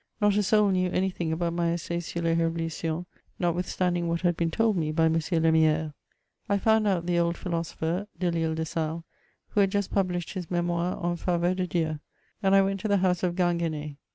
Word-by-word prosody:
Not 205 -1 +3
a 210 - +3
soul 210 0 +3
knew 185 -1 +1
any 190 +1 0
thing 170 -3 -3
about 170 +1 -1
my 170 -1 +1
Essai 170 0 -3
sur 170 0 -5
Us - - -3
JievolutionSy 165 0 -1 0.3
notwithstanding 175 0 0
what 170 0 -1
had 175 -2 +2
been 165 0 0
told 225 +5 +1
me 155 -3 0
by 160 +1 +2
M. 160 - +3
Lemiere. 160 -1 +2 0.6
I 200 - +3
found 220 +1 +3
out 180 -4 +1
the 175 -1 +1
old 170 0 +1
philosopher, 170 +2 -3
Delisle 165 -3 0
de 160 0 -2
Sales, 160 +1 -3 0.5
who - - 0
had 195 -1 +4
just 200 0 -1
published 180 -3 -1
his 185 -4 -5
Mdtnoire 175 0 -1
en 175 0 0
Faveur 175 +1 +1
de 185 -1 -1
Dieu; 160 -3 -1 0.4
and 195 -1 +3
1 195 0 +6
went 195 0 -1
to 215 - -3
the 200 -1 +3
house 180 -2 +1
of 175 -2 0
Ginguen6. 165 -5 -1
175 Hz, 205 wpm, -27 LUFS, 165-185 Hz, 0.6 s, 1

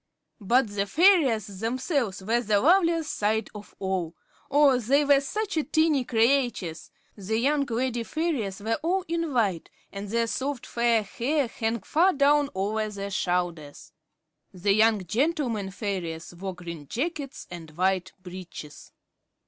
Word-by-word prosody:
But 235 +5 +2
the 205 0 -2
fairies 260 - +3
themselves 235 - -1
were 230 +4 +1
the 210 -3 +2
loveliest 335 - +3
sight 215 +1 0
of 210 -1 -11
all. 185 -4 -2 0.3
Oh, 280 -2 +5
they 275 +5 +2
were 280 -1 +5
such 395 +4 -2
tiny 315 -4 +3
creatures! 235 -8 +1 0.3
The 210 +2 -2
young 280 +4 +2
lady 240 +1 -1
fairies 230 - -2
were 225 +2 -1
all 365 +3 0
in 335 -1 -2
white, 205 - 0 0.2
and 200 0 -6
their 230 +2 +1
soft, 260 +4 -3
fair 235 -2 +1
hair 260 +7 -1
hung 225 -1 -2
far 350 - +3
down 285 0 +3
over 215 +3 -1
their 200 -1 -6
shoulders. 175 -6 -2 0.6
The 195 +2 +1
young 215 -2 +3
gentlemen 240 - 0
fairies 185 -5 -4
wore 190 +1 -6
green 170 -4 -8
jackets 285 - -4
and 170 -2 -8
white 185 0 0
breeches. 180 -5 -10
225 Hz, 140 wpm, -26 LUFS, 195-280 Hz, 0.6 s, Oh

